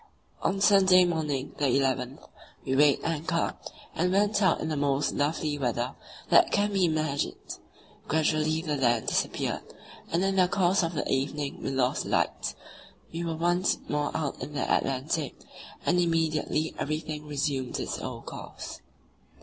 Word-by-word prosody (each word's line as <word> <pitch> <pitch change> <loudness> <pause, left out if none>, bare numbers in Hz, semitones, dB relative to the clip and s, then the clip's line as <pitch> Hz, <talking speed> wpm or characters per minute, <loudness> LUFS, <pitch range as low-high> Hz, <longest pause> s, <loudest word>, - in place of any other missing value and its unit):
On 195 0 0
Sunday 190 -2 +6
morning, 150 -6 -2
the 145 - +2
11th, 130 -1 0 0.4
we 130 - 0
weighed 145 0 +5
anchor, 165 +1 -1 0.4
and 180 +2 +1
went 205 +2 +2
out 185 -5 +3
in - - -3
the 155 - -1
most 140 0 +1
lovely 150 0 -1
weather 120 -1 -1 0.4
that - - +6
can 205 0 +1
be 190 -2 +3
imagined. 155 -3 -2 0.5
Gradually 155 +1 +1
the 150 -4 -1
land 120 -4 +2
disappeared, - - -1 0.5
and 170 +3 +1
in 195 0 +1
the 185 -1 +5
course 185 +1 +2
of 165 -1 -2
the - - -1
evening 140 +1 -2
we - - -2
lost 130 -1 0
the - - -6
lights; - - 0 0.6
we 170 +1 -3
were 165 -1 -2
once 175 +3 +1
more 150 0 0
out 150 -4 -3
in 150 - -6
the 140 - -1
Atlantic, 135 +3 -1 0.5
and 180 - +3
immediately 160 -2 +1
everything 155 0 -3
resumed 140 -3 -2
its - - -3
old - - -6
course. - - -8
155 Hz, 155 wpm, -28 LUFS, 140-175 Hz, 0.6 s, Sunday